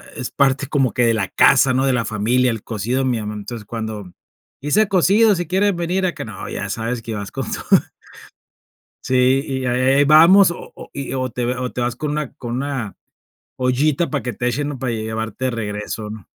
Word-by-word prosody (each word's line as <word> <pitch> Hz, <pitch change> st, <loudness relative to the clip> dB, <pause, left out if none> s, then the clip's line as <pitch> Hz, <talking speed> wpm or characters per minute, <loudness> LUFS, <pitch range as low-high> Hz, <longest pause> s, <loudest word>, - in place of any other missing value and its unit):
es 125 Hz, -3 st, -5 dB
parte 140 Hz, 0 st, +1 dB
como 135 Hz, -5 st, +1 dB
que 120 Hz, -, +2 dB
de 115 Hz, -, +3 dB
la 95 Hz, -4 st, -1 dB
casa, 130 Hz, -1 st, +4 dB
¿no?, 130 Hz, +1 st, +1 dB
de 135 Hz, -, +2 dB
la 115 Hz, -2 st, 0 dB
familia, 120 Hz, +4 st, +1 dB
el 115 Hz, -2 st, -5 dB
cocido 115 Hz, +4 st, -2 dB
de -, -, 0 dB
mi 120 Hz, -, 0 dB
amá, 105 Hz, 0 st, -5 dB
entonces, 105 Hz, +1 st, -7 dB
cuando: 110 Hz, -4 st, -6 dB, 0.5 s
"hice 190 Hz, +10 st, +2 dB
cocido, 200 Hz, +3 st, +4 dB
si 175 Hz, -1 st, -3 dB
quieren 195 Hz, +1 st, +1 dB
venir 180 Hz, +2 st, -1 dB
acá", 175 Hz, -, -3 dB
no, 105 Hz, -4 st, -8 dB
ya 105 Hz, -, -4 dB
sabes 115 Hz, +3 st, -3 dB
que 115 Hz, -, -5 dB
vas 100 Hz, -1 st, -6 dB
con -, -, -4 dB
todo. -, -, +3 dB, 1.2 s
Sí, 130 Hz, +1 st, +3 dB
y 130 Hz, -1 st, -3 dB
a 125 Hz, -1 st, 0 dB
eh 130 Hz, +2 st, +3 dB
eh -, -, +5 dB
vamos, 170 Hz, +6 st, +7 dB
o 170 Hz, -, -8 dB
o -, -, -12 dB
y 135 Hz, -2 st, -5 dB
o 130 Hz, -1 st, -2 dB
te 120 Hz, 0 st, -3 dB
o 125 Hz, 0 st, -4 dB
te 125 Hz, -, -4 dB
vas 120 Hz, -1 st, -1 dB
con 150 Hz, +2 st, -3 dB
una 150 Hz, -3 st, -3 dB
con 120 Hz, 0 st, -5 dB
una 135 Hz, -6 st, -4 dB, 0.6 s
ollita 135 Hz, +6 st, +1 dB
para 140 Hz, -3 st, -2 dB
que 125 Hz, -, -3 dB
te 120 Hz, +3 st, -3 dB
echen, 145 Hz, +4 st, -1 dB
¿no?, 145 Hz, -, -5 dB
para 125 Hz, -1 st, -2 dB
llevarte 110 Hz, +3 st, -3 dB
de -, -, 0 dB
regreso, 105 Hz, -1 st, -4 dB
¿no? 105 Hz, -4 st, -9 dB
125 Hz, 220 wpm, -20 LUFS, 115-145 Hz, 1.2 s, vamos